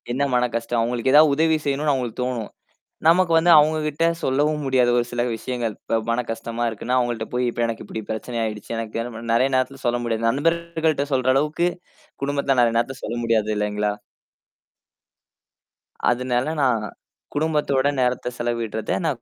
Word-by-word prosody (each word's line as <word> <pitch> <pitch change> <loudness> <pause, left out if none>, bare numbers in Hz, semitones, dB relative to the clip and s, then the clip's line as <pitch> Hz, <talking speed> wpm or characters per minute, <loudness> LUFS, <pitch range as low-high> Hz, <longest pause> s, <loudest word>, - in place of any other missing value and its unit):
என்ன 135 +3 -1
மனக்கஷ்டம்" 120 -1 0
அவுங்களுக்கு 120 +3 0
ஏதாவது 150 -1 +7
உதவி 160 +1 +3
செய்யணுன்னு 145 +1 +1
அவுங்களுக்கு 125 -2 -3
தோணும். 120 -4 -3 0.6
நமக்கு 170 +1 +4
வந்து, 170 +2 +3
அவுங்கக்கிட்ட 155 +1 +1 0.2
சொல்லவும் 150 +3 +1
முடியாது, 130 -2 +3
ஒரு 120 - +2
சில 120 0 -1
விஷயங்கள். 120 -2 -3
இப்ப 115 - -1
மனக்கஷ்டமா 115 0 -2
இருக்குன்னு, 125 +4 -2
அவுங்கள்ட்ட 120 -2 -1
போய், 125 0 +1
"இப்ப 120 - -4
எனக்கு 115 - -5
இப்பிடி 110 - -6
பிரச்சனை 115 +2 -4
ஆயிடுச்சு. 105 -1 -5
எனக்கு 115 0 -4
என்ன 120 - -5
பண்?" 115 0 -4
நெறையா 130 +3 +3
நேரத்துல 130 +1 -1
சொல்ல 120 0 +1
முடியாது. 115 0 0
நண்பர்கள்ட்ட 160 +1 0
சொல்ற 130 -1 +1
அளவுக்கு, 150 +5 +1 0.5
குடும்பத்துல 140 -1 0
நான் 120 - +6
அந்த 115 0 0
நேரத்தில 125 +2 -3
சொல்ல 120 - -4
முடியாது 110 -2 +1
இல்லேங்களா! 105 0 -1 2.2
அதுனால, 125 0 0 0.2
நான் 115 -5 +2 0.5
குடும்பத்தோட 145 -3 +1
நேரத்த 125 -1 0
செலவிடுறத 115 -2 -2
நான் 140 -7 -1
125 Hz, 155 wpm, -22 LUFS, 115-145 Hz, 2.2 s, ஏதாவது